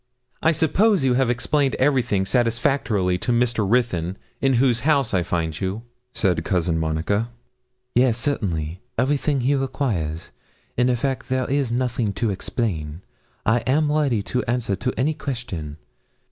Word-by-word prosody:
'I 160 - +4
suppose 190 +5 +3
you 130 -2 +3
have 130 -1 +2
explained 135 +3 +1
everything 125 -8 +2
satisfactorily 115 -5 +1
to 125 - -1
Mr. 120 -4 +1
Ruthyn, 100 -7 +1 0.2
in 135 -1 +3
whose 120 -1 +3
house 140 -5 +2
I 95 - +3
find 85 -2 -2
you?' 95 +4 -2 0.3
said 90 -8 +1
Cousin 85 -2 0
Monica. 80 +8 0 0.6
'Yes, 120 -2 +3
certainly, 90 - -2 0.2
everything 140 0 +1
he 130 +4 +2
requires 125 - -2 0.4
in 125 +1 +2
effect 130 +2 -1
there 130 -1 0
is 135 -3 0
nothing 120 -4 0
to 110 +2 -1
explain. 90 -6 -3 0.4
I 115 +2 +3
am 145 +3 +2
ready 140 -9 +1
to 125 +4 -1
answer 120 -4 0
to 125 +6 -2
any 140 +6 +1
question. 115 - -5
120 Hz, 145 wpm, -23 LUFS, 95-135 Hz, 0.6 s, I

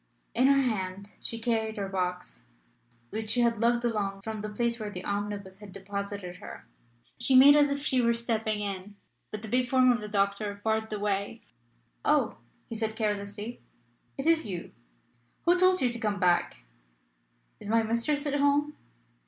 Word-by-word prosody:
In 255 +3 +4
her 275 0 +5
hand 200 -4 -3
she 230 - -1
carried 225 -1 -1
her 200 -1 -2
box, 180 - -4 0.7
which 220 0 -4
she 245 +3 +3
had 235 -2 +2
lugged 235 +1 +2
along 200 -4 -1
from 220 -1 -5
the 215 - -4
place 235 +2 -1
where 215 -1 -4
the 185 -3 -7
omnibus 200 -1 -4
had 205 -2 -11
deposited 200 -1 -6
her. 200 - -10 0.5
She 250 +2 +3
made 280 +3 +9
as 290 -1 +5
if 280 +1 -3
she 255 -3 +2
were 235 0 +3
stepping 220 -2 -1
in; 200 0 -5 0.3
but 215 0 -7
the - - -6
big 250 +2 +1
form 255 -1 +5
of 235 -3 0
the 210 - -5
doctor 200 0 -1
barred 220 0 0
the 215 - -3
way. 200 +2 -2 0.6
"Oh!" - - +2 0.3
he - - -7
said 220 -1 -2
carelessly, 210 +1 -3 0.6
"it 270 - -4
is 330 0 +4
you. 180 -4 -5 0.7
Who 350 +1 +5
told 370 -2 +4
you 250 - +3
to 240 0 -4
come 210 -3 -1
back?" 175 - +1 1.0
"Is - - -8
my 225 +1 +3
mistress 235 +7 0
at 290 0 0
home?" 285 +1 +2
220 Hz, 175 wpm, -28 LUFS, 200-240 Hz, 1.0 s, made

